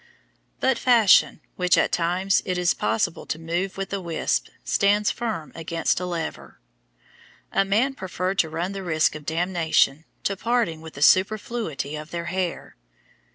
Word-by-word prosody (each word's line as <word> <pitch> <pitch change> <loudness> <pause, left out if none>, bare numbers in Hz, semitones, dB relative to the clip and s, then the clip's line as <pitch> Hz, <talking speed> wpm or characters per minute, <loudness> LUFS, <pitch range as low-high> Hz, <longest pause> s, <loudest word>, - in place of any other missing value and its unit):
But 260 -2 +1
fashion, 230 -10 +5 0.2
which 180 -1 +3
at - - +2
times 180 +3 +1
it 180 -1 -2
is 180 -1 +2
possible 110 +8 -1
to - - -2
move 170 +4 -3
with 195 0 -4
a 200 - -2
wisp, 170 -2 -1 0.2
stands 205 +1 +2
firm 195 -10 -4
against 165 0 -1
a 180 - -3
lever; 170 -2 -5 0.9
and 195 - +1
men 240 +7 +2
preferred 185 -3 -3
to 160 - +3
run 170 +4 -3
the 195 -1 -5
risk 160 -4 +1
of 150 -1 -10
damnation 165 -3 +1 0.2
to 195 - 0
parting 225 -7 0
with 160 0 -11
the 145 - -1
superfluity 190 - +1
of 155 +1 -7
their 170 0 -4
hair. 185 -2 -3
180 Hz, 155 wpm, -24 LUFS, 160-195 Hz, 0.9 s, fashion